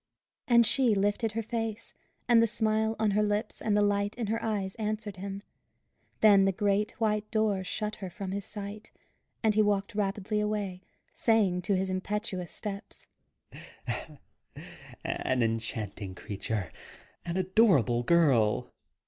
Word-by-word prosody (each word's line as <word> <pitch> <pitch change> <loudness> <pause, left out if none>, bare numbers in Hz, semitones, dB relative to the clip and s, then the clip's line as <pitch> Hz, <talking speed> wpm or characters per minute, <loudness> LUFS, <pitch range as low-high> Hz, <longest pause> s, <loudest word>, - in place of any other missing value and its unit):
And 235 -1 +6
she 245 -2 +3
lifted 205 +3 0
her 225 +1 -2
face, 225 0 -4 0.3
and 235 -2 +6
the 230 - +4
smile 220 0 +1
on 215 -1 +2
her 210 +1 +2
lips 210 +1 -1
and 210 -2 +1
the 210 - +4
light 205 0 +1
in 240 - -2
her 225 - -2
eyes 200 -4 -1
answered 215 -2 -3
him. 195 +1 -6 0.8
Then 200 -3 +7
the 195 - +3
great 200 +2 0
white 215 -1 0
door 215 -4 +1
shut 210 +3 -3
her 190 -3 -6
from 190 +1 -6
his 200 +1 -3
sight, 210 +1 -7 0.5
and 220 -1 +4
he 215 - +4
walked 205 0 +1
rapidly 205 0 -1
away, 205 -3 -2 0.3
saying 205 -6 +2
to 195 +2 +1
his 190 0 -1
impetuous 185 -1 -3
steps 200 -2 -5 2.0
"An 130 -2 0
enchanting 110 -4 -3
creature! 100 -1 -4 0.5
An 170 +1 -3
adorable 185 - +3
girl! 125 -8 +3
205 Hz, 140 wpm, -29 LUFS, 185-215 Hz, 2.0 s, Then